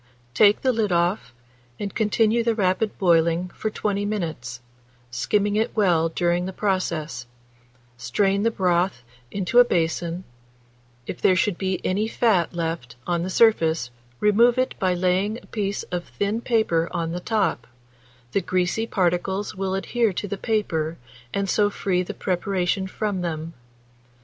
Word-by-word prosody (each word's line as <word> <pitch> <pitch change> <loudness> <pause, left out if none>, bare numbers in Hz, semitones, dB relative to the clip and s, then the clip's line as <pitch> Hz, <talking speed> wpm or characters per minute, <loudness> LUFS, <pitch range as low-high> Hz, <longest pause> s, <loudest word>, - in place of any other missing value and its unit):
Take 205 +10 +5
the 260 - +3
lid 220 -4 0
off, 175 - +1 0.5
and 200 -2 -4
continue 220 +1 +2
the 230 -1 +1
rapid 205 +1 0
boiling 170 -1 +2
for 215 - -3
20 205 -1 -2
minutes, 160 - -4 0.5
skimming 205 +11 0
it 220 +1 0
well 175 -6 +3
during 175 +2 0
the - - -4
process; 165 - -2 0.7
strain 195 - +1
the 230 - +3
broth 180 - 0 0.3
into 200 +5 +2
a - - +10
basin; 170 -3 -1 0.8
if 170 - -6
there 185 - +4
should 190 +1 +1
be 190 +1 -2
any 205 +4 +1
fat 220 -7 +2
left 165 -9 -3
on 175 -1 0
the 180 - -3
surface, 165 - +3 0.3
remove 235 +4 +4
it 255 0 +1
by 185 -1 +1
laying 185 +4 +1
a - - -14
piece 200 -2 -3
of 175 -1 -2
thin 205 +3 -2
paper 220 -9 +1
on 165 -1 -2
the 175 - -3
top: 180 - -1 0.6
the 195 - +1
greasy 185 +5 0
particles 190 +1 0
will 190 0 -2
adhere 225 +3 +1
to 205 - -3
the 200 - -3
paper, 170 -8 -1 0.3
and 200 +5 -1
so 205 +2 +2
free 190 -3 0
the 180 - -5
preparation 190 0 -1
from 200 -1 -2
them. 165 -1 -4
185 Hz, 150 wpm, -24 LUFS, 170-210 Hz, 0.8 s, a